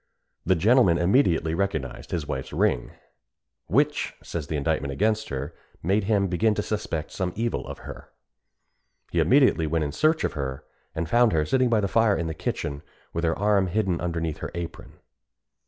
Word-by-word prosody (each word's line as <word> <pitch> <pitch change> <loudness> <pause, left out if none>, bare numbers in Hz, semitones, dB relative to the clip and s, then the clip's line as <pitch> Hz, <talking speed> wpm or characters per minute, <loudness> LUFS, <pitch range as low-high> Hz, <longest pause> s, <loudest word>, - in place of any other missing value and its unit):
The 95 - +4
gentleman 100 -1 +4
immediately 85 - +2
recognised 80 -8 -2
his 80 -4 -3
wife's 65 - -4
ring, - - +1 0.8
"which," - - +1
says 80 -4 -5
the 80 - -3
indictment 75 -1 -1
against 110 +8 0
her, 70 +4 -4 0.3
"made 95 +4 +1
him 100 -2 +2
begin 105 +4 +1
to 105 - -1
suspect 85 -8 -3
some 95 -2 -2
evil 115 +2 -2
of - - -7
her." - - -9 1.0
He - - +1
immediately 130 - +4
went 80 +1 0
in 70 - -3
search 155 - +2
of - - -1
her, 65 -3 -4 0.3
and 80 0 -2
found 120 +4 +4
her 75 -1 +2
sitting 130 +8 +2
by 110 -2 +3
the 100 - 0
fire 110 0 +3
in 85 - -2
the 80 - -3
kitchen, 70 -2 -3 0.3
with 85 - -2
her 80 -1 +1
arm 100 -2 +2
hidden 95 -2 0
underneath 85 -3 -2
her - - -4
apron. 85 -1 -7
90 Hz, 175 wpm, -25 LUFS, 80-105 Hz, 1.0 s, The